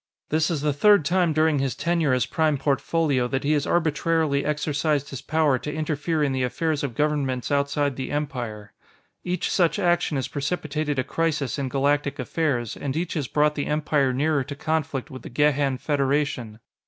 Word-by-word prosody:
This 155 0 +2
is 160 -5 -1
the 150 -1 +1
third 200 +3 +5
time 175 +1 +2
during 155 -1 +2
his 135 -1 -1
tenure 170 -4 +1
as 125 -1 +2
Prime 155 -2 +1
Portfolio 140 -1 +1
that 135 +1 -2
he 145 - +1
has 150 -2 +1
arbitrarily 160 -3 +1
exercised 150 -1 -1
his 135 - -6
power 155 -4 +2
to 150 - -5
interfere 155 +1 -1
in 140 - +1
the 130 -1 -1
affairs 150 +4 -1
of 130 -5 -3
governments 145 -3 0
outside 140 0 +1
the 130 0 -4
Empire. 120 -8 -4 0.5
Each 180 0 -2
such 175 -1 +2
action 175 -5 +1
has 130 - -2
precipitated 150 -1 -2
a 130 - +1
crisis 150 -1 -1
in 135 -2 -2
Galactic 140 +1 +1
affairs, 130 -4 -1
and 140 +1 -4
each 175 +1 -2
has 150 -6 -2
brought 150 +2 +2
the 145 -1 -3
Empire 150 -3 +1
nearer 145 +2 +1
to 140 - -6
conflict 155 -3 -2
with 130 - -8
the - - -9
Gehan 140 0 +2
Federation. 140 -6 -1
145 Hz, 180 wpm, -24 LUFS, 135-155 Hz, 0.5 s, third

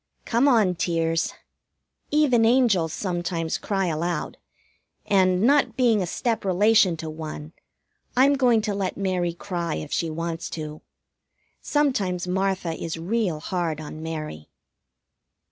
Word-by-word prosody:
Come 240 +4 +2
on, 220 -9 +4
tears! 165 -1 0 0.7
Even 285 -6 +3
angels 225 -9 +3
sometimes 175 -3 -2
cry 195 -2 -1
aloud; 170 0 -2 0.7
and, 185 -1 +3
not 260 -2 +3
being 235 -5 +3
a 180 - -2
step 230 +5 -1
relation 195 -1 +4
to 160 - -6
one, 155 0 -7 0.6
I'm 275 +3 +6
going 245 -5 +3
to 210 - -1
let 195 -2 -2
Mary 185 -3 -1
cry 175 -2 -3
if 80 - -6
she 165 - 0
wants 165 +1 -4
to. 155 -1 -6 0.8
Sometimes 200 - 0
Martha 190 -2 -1
is 165 0 -5
real 180 -1 -1
hard 165 -1 -2
on 155 0 -8
Mary. 155 - -6
180 Hz, 130 wpm, -24 LUFS, 165-225 Hz, 0.8 s, I'm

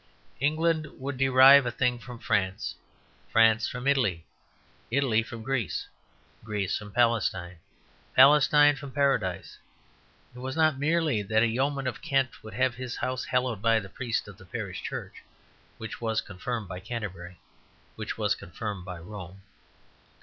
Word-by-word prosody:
England 155 +2 +1
would 135 +1 -4
derive 135 +1 +7
a - - -1
thing 125 0 0
from 125 0 -9
France, 100 -2 -1 0.6
France 115 0 +4
from 125 0 -6
Italy, 125 - +1 0.6
Italy 120 -3 +2
from 115 0 -8
Greece, 125 -6 -2 0.6
Greece 105 -3 -2
from 105 -1 -6
Palestine, 100 -6 +1 0.6
Palestine 145 0 +6
from 140 -1 -9
Paradise. 135 - 0 0.8
It - - -10
was 130 +1 -5
not 155 -4 +2
merely 155 -5 +1
that 110 +2 +2
a - - +4
yeoman 135 +4 -1
of 130 - -3
Kent 135 -5 0
would 110 -1 -9
have 130 0 +2
his 125 +1 -6
house 130 0 -3
hallowed 125 -4 -1
by 115 0 +3
the 95 -2 -9
priest 115 0 -3
of 100 -2 -11
the 95 - -14
parish 95 -2 -5
church, - - -6 0.6
which 110 +1 -7
was 110 -2 0
confirmed 105 +3 -5
by 90 -1 -6
Canterbury, 95 -5 -6 0.6
which - - -5
was - - +1
confirmed 100 +1 -6
by 90 -1 -7
Rome. 95 +1 -10
120 Hz, 150 wpm, -27 LUFS, 105-135 Hz, 0.8 s, derive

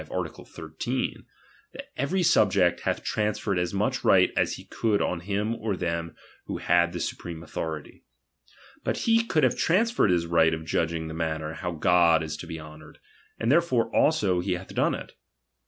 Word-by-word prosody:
art. - - -3
13, 85 +11 -4 0.5
that - - -10
every 175 +8 0
sub 110 - +4
ject 90 -2 +2
hath - - -2
transferred 105 -2 -1
as 90 0 -1
much 100 +2 -1
right - - +5
as - - +1
he - - -9
could 105 -3 0
on 90 - -1
him 105 +5 -2
or 110 -4 -3
them 85 -2 -3 0.3
who - - -4
had 85 0 +2
the 90 - -5
supreme 85 -1 -5
authority. 80 -2 -6 0.8
But - - -1
he 230 0 +4
could 160 -9 +1
have - - +3
transferred 225 - +2
his 85 -2 +2
right 80 -1 +3
of 80 0 -8
judging 80 0 -1
the 80 - -6
manner 80 -1 -3
how 90 +2 -4
God 85 0 +4
is 75 -1 -4
to 85 - -9
be 80 -1 -6
honoured; 75 0 -12 0.4
and 115 +2 +1
therefore 150 -7 +2
also 105 - +3
he 90 +1 -1
hath 90 +1 -7
done - - +1
it. - - -8
90 Hz, 180 wpm, -26 LUFS, 80-110 Hz, 0.8 s, right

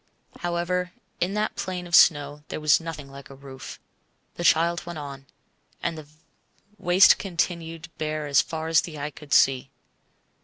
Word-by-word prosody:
However, 175 +1 -2 0.3
in 185 +3 -1
that 210 0 -1
plain 180 -1 -4
of 175 - -12
snow 145 -2 +5
there - - -5
was 155 -1 +4
nothing 155 -4 -8
like 140 0 -12
a 135 - -11
roof. 135 -1 -10 0.5
The 175 - -6
child 170 +1 +3
went 170 -1 -7
on, 140 -2 -8 0.6
and 170 -1 -1
the 155 -2 -10 0.7
waste 180 +2 +6
continued 165 -3 -3
bare 155 -1 -2
as 140 -2 +4
far 160 0 -5
as 165 0 +4
eye 150 -1 -5
could 145 0 -14
see. 135 0 +4
160 Hz, 155 wpm, -25 LUFS, 145-175 Hz, 0.7 s, waste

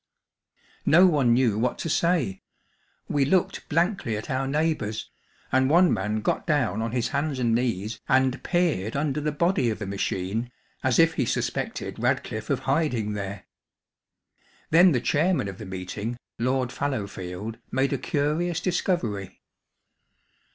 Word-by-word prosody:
No 175 +4 +7
one 145 -9 +3
knew 120 -5 +2
what 125 +2 0
to - - -4
say; 155 - +1 0.7
we 145 - +1
looked 180 +6 0
blankly 165 - 0
at 110 - -6
our 135 +1 0
neighbours, 145 -7 -1 0.4
and 130 0 +3
one 175 +3 +5
man 105 +3 -1
got - - -1
down 130 - +1
on 115 0 -2
his 120 -1 -1
hands 145 -1 -1
and 120 -3 +1
knees 110 -3 -1
and 130 0 +3
peered 165 - 0
under 150 0 0
the 150 +1 0
body 170 - +1
of 110 - -2
the 105 - -5
machine 100 +4 -2 0.3
as 130 -2 +2
if 165 0 +5
he 130 - 0
suspected - - -2
Radcliffe - - -1
of - - 0
hiding 135 -7 0
there. 100 -1 -5 1.3
Then 175 +3 +7
the 125 -5 +1
chairman 160 - +1
of 95 0 -7
the 105 - -7
meeting, 95 +5 -5 0.2
Lord 125 +1 0
Fallowfield, 105 -6 -4
made 135 +2 +1
a 135 - -1
curious 155 +5 0
discovery. 130 - -1
130 Hz, 145 wpm, -26 LUFS, 110-155 Hz, 1.3 s, No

